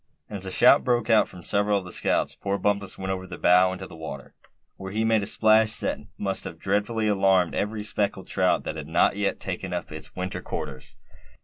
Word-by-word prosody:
And 105 - -8
as 95 - -2
a - - -4
shout 125 - +6
broke 120 -3 +1
out 110 -1 +5
from 90 - -12
several 100 +2 +1
of 95 - -5
the 90 - -9
scouts, - - 0
poor 100 0 -2
Bumpus 100 0 -1
went 95 0 -3
over 95 0 -4
the 85 -2 -8
bow 90 +1 +5
into 95 0 -6
the 85 - -12
water; 80 -4 -8 0.4
where 95 0 -8
he 110 +2 0
made 110 -1 +3
a 100 - -4
splash 110 0 +3
that - - -2 0.2
must 95 -2 -1
have 80 - -7
dreadfully 105 +4 0
alarmed 95 -3 +3
every 105 +1 -2
speckled 100 -2 -2
trout 95 -1 +1
that 80 - -5
had 75 -1 -6
not 80 +4 +3
yet 100 -1 -1
taken 95 0 -4
up 85 -2 -4
its 75 0 -6
winter 90 0 -4
quarters. 65 -2 -7
95 Hz, 220 wpm, -25 LUFS, 90-105 Hz, 0.4 s, shout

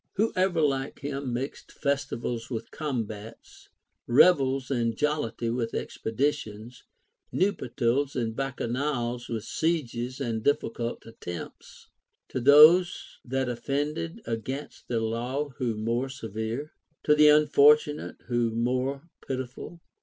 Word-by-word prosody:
Who 220 +3 +1
ever 185 -3 +2
like 135 -2 -1
him 140 -2 -3
mixed 130 +4 -5
festivals 135 -5 -2
with 115 -4 -5
combats, 115 -7 -6 0.4
revels 135 -1 +4
and 115 -3 0
jollity 120 -6 -1
with 115 -1 -2
expeditions, 115 -2 -3 0.5
nuptials 135 - 0
and 115 -3 -2
bacchanals 125 -2 -2
Avith 115 -2 -3
sieges 130 -6 -2
and 115 -5 -2
difficult 120 -4 -1
attempts? 90 -6 -9 0.4
To - - -2
those 155 +7 +6
that 130 +1 -1
offended 145 - -3
against 130 +5 -5
the 115 - 0
law 120 +6 -2
who 120 -5 -1
more 115 +5 -1
severe? 115 +4 -5 0.3
To 150 - +5
the 150 0 +6
unfortunate 150 0 +4
who 120 -2 +1
more 130 +6 -1 0.2
pitiful 130 +6 -5
130 Hz, 110 wpm, -27 LUFS, 115-145 Hz, 0.5 s, those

